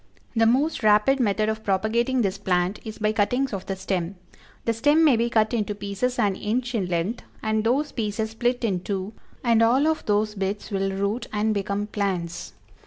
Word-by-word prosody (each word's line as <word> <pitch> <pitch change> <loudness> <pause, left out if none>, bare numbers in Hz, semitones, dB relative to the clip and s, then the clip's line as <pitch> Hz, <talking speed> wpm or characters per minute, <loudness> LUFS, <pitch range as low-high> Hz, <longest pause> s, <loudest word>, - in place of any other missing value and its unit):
The 225 0 +4
most 275 +7 +2
rapid 215 +5 +4
method 215 -2 +1
of 220 0 -2
propagating 230 +6 +1
this 195 0 -1
plant 185 0 0
is 215 -1 -7
by 215 0 +1
cuttings 245 +5 +1
of 190 -2 -5
the 195 - -2
stem; 185 -1 -2 0.5
the 230 - +2
stem 290 +8 +3
may 285 -5 +6
be 235 +1 +1
cut 220 0 +2
into 210 -3 -1
pieces 205 +5 -2
an 205 -5 +2
inch 240 +5 -2
in 200 -6 0
length, 180 +6 -2 0.2
and 220 0 +1
those 270 +6 +1
pieces 220 -1 -2
split 240 +2 -1
in 195 -6 +1
two, 195 +2 -4 0.3
and 230 -2 +4
all 250 +5 +4
of 315 0 +1
those 210 0 +1
bits 200 +2 -3
will 195 -1 0
root 200 +5 -2
and 215 +1 +1
become 200 0 -2
plants. 185 - -3
215 Hz, 190 wpm, -24 LUFS, 200-235 Hz, 0.5 s, may